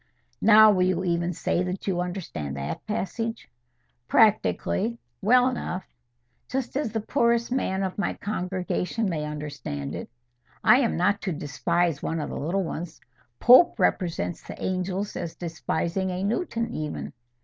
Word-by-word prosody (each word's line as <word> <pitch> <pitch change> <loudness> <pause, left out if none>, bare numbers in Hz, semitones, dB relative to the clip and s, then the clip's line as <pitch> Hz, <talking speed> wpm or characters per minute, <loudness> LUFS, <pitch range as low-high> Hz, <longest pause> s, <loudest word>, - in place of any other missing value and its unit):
'" 120 - -46
"Now 215 0 +8
will 185 -3 +2
you 185 0 +2
even 170 -1 0
say 175 +1 -1
that 185 +1 -3
you 180 -3 0
understand 165 - -4
that 70 0 -4
passage?" 225 +2 -3 0.6
"Practically, 220 +1 +2 0.2
well 250 +5 +5
enough; 190 -7 -3 0.7
just 260 -1 -3
as 280 -6 -1
the 225 - -2
poorest 235 +2 +1
man 195 -7 0
of 190 +1 -3
my 195 - 0
congregation 190 +2 -2
may 155 -5 -2
understand 145 - -5
it. - - -6 0.5
I 250 - +7
am 240 -5 +1
not 200 +4 +2
to 185 - -2
despise 165 +1 0
one 165 - -2
of 150 - -4
the - - -5
little 175 +7 0
ones. 165 -1 -6 0.4
Pope 255 +9 +7
represents 160 - 0
the - - -10
angels 185 +2 -2
as 165 - -4
despising 170 +2 -2
a 180 +1 -3
Newton 230 - -1
even." 150 -1 -4
185 Hz, 150 wpm, -26 LUFS, 170-220 Hz, 0.7 s, Now